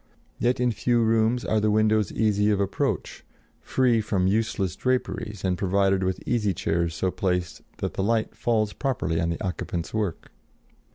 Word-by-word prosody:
Yet 120 +1 +1
in 125 -1 +2
few 120 +1 +1
rooms 115 +2 +2
are 110 - +2
the 105 0 +2
windows 110 -1 +2
easy 105 -1 +2
of 105 -2 +2
approach, 100 -1 -2 0.4
free 125 -4 +2
from 100 -4 0
useless 100 -2 0
draperies 125 -5 -2
and 90 -1 0
provided 95 0 +2
with 95 0 -2
easy 105 -6 +1
chairs 85 0 -1
so 95 +2 0
placed 90 -2 -2 0.2
that - - -3
the - - -2
light 110 +1 0
falls 110 -3 0
properly 120 - -1
on 85 - 0
the 85 - -3
occupant's 90 -2 -4
work. 105 -6 -3
105 Hz, 165 wpm, -25 LUFS, 95-115 Hz, 0.4 s, in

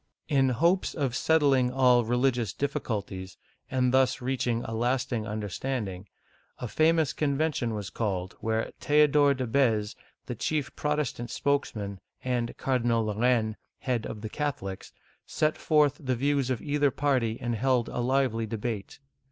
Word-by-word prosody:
In 135 -3 +3
hopes 170 +9 +2
of 135 -6 -1
settling 140 -5 +3
all 125 -2 +5
the 115 - -6
religious 120 -4 +1
difficulties, 100 -9 -3 0.3
and 125 -1 +1
thus 130 -1 +3
reaching 125 -2 -1
a 115 - -5
lasting 120 -1 -1
understanding, 105 -1 -4 0.5
a 125 - -5
famous 160 +3 +2
conven 150 +1 0
tion 115 -4 -2
was 105 -2 -4
finally - - -19
called, 95 -1 -4
where 110 0 -1
Theodore 145 -1 +4
de 130 -1 -2
B^ze 115 - -8
(bez), 110 -6 +2 0.3
the 125 - -4
chief 145 +5 -2
Protestant 150 -5 -2
spokesman, 110 -10 -1 0.2
and 125 -2 -2
Cardinal 120 -3 +1
de 105 - -1
Lor 105 +2 -4
raine, 115 -3 +2 0.2
head 120 -4 -2
of 105 - -7
the 110 - -5
Catholics, 110 -10 -4 0.4
set 155 0 +1
forth 150 -3 +3
the 130 -4 -1
views 140 +1 +1
of 130 -3 -2
either 145 -1 +2
party 130 -5 0
and 120 -1 -2
held 125 +1 +1
a - - -4
lively 120 -3 +1
debate. 110 -1 -4
125 Hz, 160 wpm, -28 LUFS, 115-140 Hz, 0.5 s, all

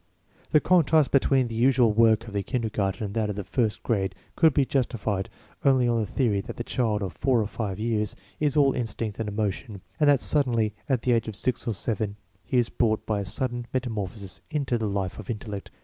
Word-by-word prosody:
The 150 - +6
contrast 160 -4 +3
between 135 -2 +3
the 115 - -7
usual 120 -1 +4
work 115 +1 +4
of 110 - -9
the 100 - 0
kinder 115 +2 -2
garten 100 0 -1
and 100 -1 -4
that 110 -1 0
of 105 - -3
the 100 - -4
first 110 +1 -1
grade 95 -5 0 0.2
could 160 -1 +5
be 140 0 +2
justified 115 -7 -1 0.3
only 130 -3 +4
on 120 -1 +2
the 110 - -1
theory 110 -7 +1
that - - -8
the 120 - -3
child 110 -5 0
of 95 -4 -4
four 130 - +1
or 110 - +1
five 100 -1 -4
years 105 -1 -1 0.2
is 150 -1 +1
all 140 -2 +5
instinct 115 -3 -3
and 110 -2 -2
emotion, 105 0 -3 0.2
and 150 -1 +5
that 140 -2 +5
suddenly 120 -8 +2 0.2
at 130 -3 +1
the 125 - +2
age 115 -1 +2
of 110 - -5
six 120 +4 -1
or 115 - +1
seven 105 0 -2 0.3
he 125 - -1
is 120 -2 +3
brought 110 -2 0
by 105 -2 0
a 100 - -3
sudden 120 +2 -2
meta 130 -2 -1
morphosis 100 -4 -6
into 140 -5 -1
the 110 -2 -1
life 100 -1 -3
of 105 - -9
intellect. 105 -3 -5
115 Hz, 225 wpm, -26 LUFS, 105-125 Hz, 0.3 s, The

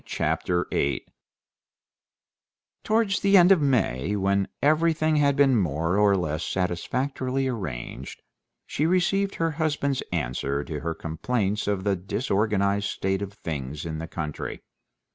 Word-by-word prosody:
Chapter 90 0 -1
8 70 -1 0 1.8
Towards 215 -3 +2
the 200 0 +5
end 180 +1 +7
of 185 -5 +6
May, 105 - +1
when 100 0 +1
everything 155 +1 +2
had 140 -1 +3
been 135 -2 +4
more 85 -3 0
or 100 -1 +4
less 80 -2 -2
satisfactorily 130 +9 -1
arranged, 70 - -5 0.4
she 150 - 0
received 195 +3 +1
her 165 0 0
husband's 145 -3 -1
answer 70 -2 -1
to 75 -1 -5
her 80 +2 -3
complaints 100 +6 -2
of 100 -2 0
the 100 -1 +1
disorganized 100 0 0
state 95 +1 -1
of 100 0 -5
things 75 -4 -5
in 80 -1 -4
the 80 - -5
country. 75 -3 -5
100 Hz, 130 wpm, -25 LUFS, -, 1.8 s, end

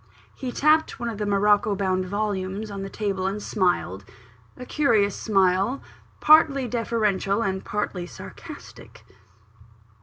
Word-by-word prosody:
He 255 -2 -5
tapped 310 +4 +2
one 235 -1 -2
of 220 -2 -6
the 210 - -2
morocco 205 0 +3
bound 185 -1 0
volumes 205 +1 -3
on 200 -1 -5
the 195 - -5
table, 195 -3 -2
and 195 +2 -2
smiled 175 - -1 0.5
a 250 - -8
curious 220 -9 +2
smile, 195 +4 +1 0.4
partly 290 -4 +5
deferential 220 -3 0
and 190 -2 -2
partly 200 -4 -3
sarcastic. - - -12
205 Hz, 125 wpm, -24 LUFS, 190-230 Hz, 0.5 s, partly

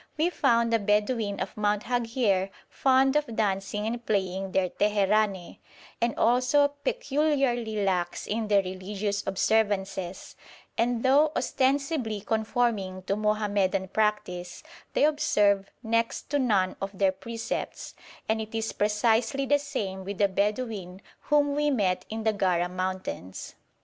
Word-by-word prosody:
We 330 +3 +2
found 235 -7 +2
the 230 - +4
Bedouin 210 0 0
of 190 - -4
Mount 210 -1 0
Haghier 230 -6 0 0.2
fond 265 +1 +3
of 295 -7 0
dancing 210 0 -1
and 235 +2 -3
playing 190 -3 -1
their 185 -1 +1
teherane, 205 -2 +1 0.4
and 235 -1 0
also 255 +5 +3
peculiarly 275 - 0
lax 180 -2 -1
in 220 +1 -2
their 200 -2 +4
religious 200 +2 -3
observances; 195 -2 0 0.4
and 235 0 0
though 285 +4 +4
ostensibly 270 -4 0
conforming 220 -3 -1
to 195 +1 -1
Mohammedan 205 -3 0
practice, 205 -4 -1 0.3
they - - +2
observe 205 -10 +2
next 230 +4 -1
to 290 - +2
none 200 -8 +1
of 195 0 -5
their 195 -1 +3
precepts; 225 +4 -5 0.3
and 220 0 0
it 220 +1 -7
is 225 0 -2
precisely 225 +6 +1
the 290 +1 +3
same 195 -9 -4
with 200 +1 -5
the 200 - +4
Bedouin 200 -2 -2 0.2
whom 290 -1 +3
we 295 +1 +1
met 200 -9 0
in 220 0 -4
the 220 -1 +2
Gara 180 -3 +1
mountains. 185 - -5
215 Hz, 135 wpm, -27 LUFS, 195-240 Hz, 0.4 s, the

